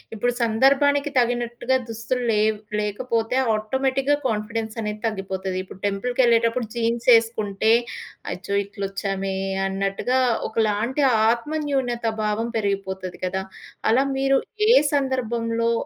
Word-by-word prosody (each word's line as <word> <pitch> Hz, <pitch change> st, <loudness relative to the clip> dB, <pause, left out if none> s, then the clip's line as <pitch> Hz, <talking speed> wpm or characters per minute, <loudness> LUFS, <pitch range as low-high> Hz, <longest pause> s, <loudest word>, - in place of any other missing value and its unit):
ఇప్పుడు 245 Hz, +3 st, 0 dB
సందర్భానికి 280 Hz, +5 st, +3 dB
తగినట్టుగా 240 Hz, +1 st, 0 dB
దుస్తులు 225 Hz, +3 st, -3 dB
లేవు 215 Hz, 0 st, +2 dB, 0.2 s
లేకపోతే 225 Hz, +3 st, -1 dB, 0.2 s
ఆటోమేటిక్‌గా 265 Hz, +6 st, 0 dB
కాన్ఫిడెన్స్ 220 Hz, +1 st, -3 dB
అనేది 210 Hz, 0 st, -4 dB
తగ్గిపోతది. 190 Hz, -3 st, -3 dB
ఇప్పుడు 185 Hz, -, -12 dB
టెంపుల్‌కెళ్ళేటప్పుడు 230 Hz, +2 st, +1 dB
జీన్స్ 235 Hz, 0 st, -1 dB
ఏసుకుంటే 220 Hz, -2 st, 0 dB, 0.6 s
అచ్చో! 200 Hz, -, -6 dB
ఇట్లా 200 Hz, 0 st, -8 dB
వచ్చామే 195 Hz, 0 st, -3 dB, 0.3 s
అన్నట్టుగా 195 Hz, +6 st, 0 dB, 0.3 s
ఒకలాంటి 220 Hz, +5 st, 0 dB, 0.3 s
ఆత్మన్యూన్యత 265 Hz, -2 st, -2 dB, 0.2 s
భావం 215 Hz, +2 st, -1 dB
పెరిగిపోతది 190 Hz, -3 st, -3 dB
కదా! 190 Hz, +1 st, -2 dB, 0.5 s
అలా 255 Hz, +4 st, +4 dB
మీరు 270 Hz, 0 st, +3 dB, 0.3 s
ఏ -, -, +8 dB, 0.2 s
సందర్భంలో 235 Hz, -4 st, 0 dB
230 Hz, 100 wpm, -23 LUFS, 210-250 Hz, 0.6 s, ఏ